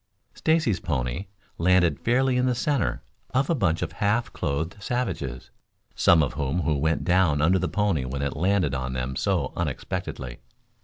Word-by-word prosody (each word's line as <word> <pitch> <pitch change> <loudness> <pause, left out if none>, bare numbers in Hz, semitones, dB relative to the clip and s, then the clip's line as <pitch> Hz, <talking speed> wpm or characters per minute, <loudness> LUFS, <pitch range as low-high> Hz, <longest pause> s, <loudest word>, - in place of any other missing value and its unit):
Stacy's 155 - +1
pony 65 +4 -2 0.3
landed 90 -3 +3
fairly 130 +2 +2
in 125 0 +2
the 125 - +1
center 140 - 0 0.3
of 135 +4 +2
a - - +4
bunch 90 - +1
of - - -3
half 110 +3 0
clothed 80 +8 -3
savages; 85 - -3 0.4
some 80 -2 +5
of 70 - -2
whom 75 +5 -1 0.2
went 80 +2 +1
down 90 -5 +3
under 90 +5 +3
the 90 - 0
pony 100 -9 +1
when 65 +2 -3
it 70 - -2
landed 90 -2 +1
on 65 -1 -2
them 65 +1 -3
so - - 0
unexpectedly. 60 -2 -4
85 Hz, 160 wpm, -25 LUFS, 70-105 Hz, 0.4 s, some